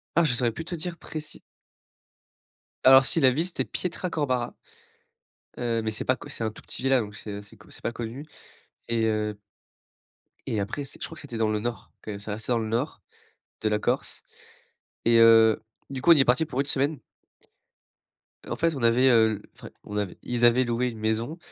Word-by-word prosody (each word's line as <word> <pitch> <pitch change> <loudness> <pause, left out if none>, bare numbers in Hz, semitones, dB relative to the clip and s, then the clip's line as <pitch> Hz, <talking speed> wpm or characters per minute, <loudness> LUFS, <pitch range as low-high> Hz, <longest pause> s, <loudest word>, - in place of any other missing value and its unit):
Ah, 170 - +5
je 150 - +2
saurais 120 -1 +1
plus 160 - -6
trop 175 - -4
dire 170 +1 -4
précis 155 -1 -8 1.4
alors 130 0 +8
si, 165 - +2
la 130 -3 +6
ville, 155 +7 0
c'était 180 - -2
Pietracorbara. 145 -9 -2 1.0
Heu, 115 -2 0
mais 110 - -1
c'est 110 - -4
pas 130 - +3
co - - -11
c'est 115 - -4
un 110 - 0
tout 110 - -14
petit - - -7
village, 135 -2 +3
donc 105 -1 -8
c'est 105 -1 -7
assez 100 0 -11
co - - -18
c'est - - -11
pas 115 - -2
connu. 120 +4 -6 0.6
Et 115 -1 +1
heu 105 -1 -1 1.1
et 110 - -1
après 115 +8 -3
c'est, 135 - -9
je - - -3
crois 165 - -11
que - - -6
c'était 135 -6 -7
dans 110 -1 +1
le 105 0 0
nord, 115 -1 -5
quand - - -7
même, 100 -1 -6
ça 105 +1 -5
restait 110 +4 -2
dans 120 - +2
le 110 -1 -3
nord 120 +8 -2 0.6
de 110 - +1
la 105 0 +1
Corse. - - -2 0.8
Et 115 0 +5
heu, 115 -1 +6 0.3
du 135 -2 -5
coup, 170 - +6
on - - +10
y 145 - +5
est - - +3
parti 125 +6 +3
pour 135 - -4
une 140 - +2
semaine. 145 +1 +1 1.5
En 120 - -3
fait, 165 +4 +1
on 135 - -5
avait, 120 +3 +5
heu 110 -4 +4 0.2
enfin, - - -11
on 105 - -6
avait 100 -3 -3
ils 120 -1 -1
avaient 120 +2 +5
loué 120 +1 0
une 115 -2 -7
maison, 110 +8 -1
120 Hz, 210 wpm, -26 LUFS, 110-135 Hz, 1.5 s, on